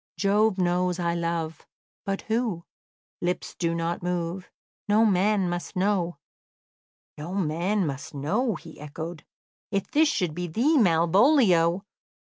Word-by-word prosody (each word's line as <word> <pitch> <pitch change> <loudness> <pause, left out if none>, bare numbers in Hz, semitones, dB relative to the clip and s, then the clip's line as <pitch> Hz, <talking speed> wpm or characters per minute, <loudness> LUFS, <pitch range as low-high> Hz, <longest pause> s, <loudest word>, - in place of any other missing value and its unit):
"Jove 205 0 +2
knows 180 0 +1
I 170 -1 0
love: 170 -2 -3 0.4
But 195 -1 -2
who? 220 -7 -1 0.6
Lips 180 +1 -2
do 170 -1 -1
not 170 +1 -2
move; 180 +1 -3 0.4
No 215 +2 +4
man 200 -1 +2
must 175 0 -4
know." 185 -3 0 1.0
"'No 170 +5 -5
man 185 +3 0
must 140 -1 -5
know,'" 210 - 0
he - - -12
echoed. 160 +3 -7 0.5
"If 195 -2 -2
this 310 +1 +4
should 180 - -1
be 175 +2 -4
thee, 245 - +2
Malvolio!" 185 - +4
180 Hz, 125 wpm, -26 LUFS, 170-205 Hz, 1.0 s, No